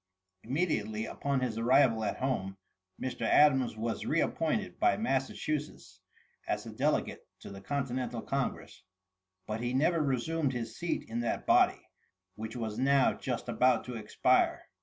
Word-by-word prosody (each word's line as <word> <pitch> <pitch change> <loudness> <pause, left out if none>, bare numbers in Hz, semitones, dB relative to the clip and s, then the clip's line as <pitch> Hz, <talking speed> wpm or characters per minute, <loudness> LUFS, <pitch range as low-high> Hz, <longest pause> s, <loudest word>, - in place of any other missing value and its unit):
Immediately 110 - -1
upon 140 +1 -2
his 115 -3 -2
arrival 120 -2 +4
at - - -2
home, 100 -8 -2 0.4
Mr. 130 -1 -4
Adams 130 -6 +4
was 115 +1 -2
RE 160 - +1
APPOINTED 165 +7 -1
by - - +3
Massachusetts 150 - -3 0.5
as - - -2
a - - -7
delegate - - -1
to - - -9
the 100 0 -9
continental 125 -2 -3
congress; 135 -1 -3 0.6
but 110 +1 -4
he 120 +1 -1
never 160 +4 +3
resumed 140 +1 0
his 115 -2 -4
seat 170 +4 -3
in 115 +1 -3
that 120 - -2
body, - - +3 0.5
which 110 +3 -7
was 110 -3 -4
now 135 0 +4
just 125 -2 -4
about 120 +1 +3
to 125 - -7
expire. 110 -2 +1
125 Hz, 145 wpm, -31 LUFS, 115-140 Hz, 0.6 s, arrival